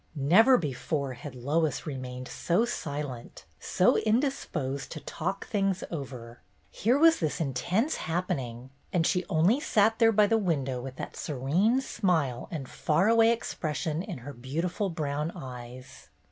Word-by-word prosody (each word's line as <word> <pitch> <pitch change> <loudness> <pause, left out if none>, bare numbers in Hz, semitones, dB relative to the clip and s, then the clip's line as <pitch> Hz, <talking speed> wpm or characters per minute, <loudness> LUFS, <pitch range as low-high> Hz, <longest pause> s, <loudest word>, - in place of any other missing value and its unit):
Never 185 - +6
before 140 - -2
had 130 +2 -9
Lois 145 +4 0
remained 130 -3 -6
so 180 +7 +1
silent, 145 - -5
so 180 - +3
indisposed 215 - -1
to 155 - -6
"talk 190 +6 -4
things 195 -3 0
over." 125 -6 -7 0.3
Here 235 +7 +2
was 325 +2 +6
this 155 -3 -1
intense 175 - 0
happening, 130 -7 -3 0.2
and 170 -2 +2
she 180 +2 +1
only 185 - +3
sat 225 -4 +2
there 225 -1 +6
by 210 -1 +5
the 225 +2 +2
window 140 - -1
with 130 +1 -7
that - - -7
serene 165 - +1
smile 160 - 0
and 150 -6 -5
far 165 +11 +1
away 230 0 +5
expression 160 -8 -2
in 190 -4 -6
her 145 - -6
beautiful 165 - -2
brown 150 -1 -2
eyes. 125 -4 -10
160 Hz, 145 wpm, -28 LUFS, 135-200 Hz, 0.3 s, Never